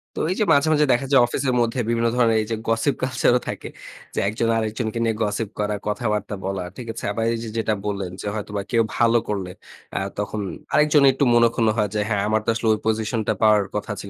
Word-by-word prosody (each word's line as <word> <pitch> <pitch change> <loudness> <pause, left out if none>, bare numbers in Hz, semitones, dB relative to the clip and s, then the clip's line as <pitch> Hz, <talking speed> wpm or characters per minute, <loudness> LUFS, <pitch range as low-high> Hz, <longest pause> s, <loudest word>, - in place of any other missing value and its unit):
তো - - -4
এই - - -1
যে - - +4
মাঝে, 145 +2 +3
মাঝে 150 0 +4
দেখা 125 +3 0
যায়, 135 - +7
অফিসের 130 +2 -1
মধ্যে 120 +2 0
বিভিন্ন 115 0 +1
ধরনের 115 -3 +3
এই 110 - -5
যে - - +1
গসিপ 115 +5 +1
কালচার 130 -1 +2
ও - - -2
থাকে। - - -5 0.4
যে - - -1
১ 100 - -1
জন 115 -1 +2
আরেকজনকে 110 +1 -2
নিয়ে 115 -1 +1
গসিপ 105 0 -2
করা, 105 0 0
কথাবার্তা 105 -1 -2
বলা। 95 -1 -2
ঠিক 120 -2 -7
আছে? 115 - -8
আবার 115 +2 -2
এই 115 - -2
যে 115 - -5
যেটা 110 -1 +1
বললেন, 100 -3 -3
যে - - -5
হয়তোবা 105 -1 -4
কেউ 115 -2 +3
ভালো 115 0 +4
করলে 95 -3 -3 0.4
অ্যা - - -1 0.2
তখন 105 +1 -3 0.3
আরেকজন 150 -1 +4
একটু 135 - 0
মনোক্ষুণ্ণ 115 -1 +3
হয়। 105 -2 +1
যে, 105 - +1
"হ্যাঁ, 105 -3 +1
আমার 110 +1 +1
তো - - -1
আসলে 115 0 -2
ওই 110 - -2
পজিশনটা 110 0 0
পাওয়ার 105 -2 +5
কথা 105 +1 -3
ছিল।" 100 - -8
110 Hz, 230 wpm, -22 LUFS, 105-120 Hz, 0.4 s, যায়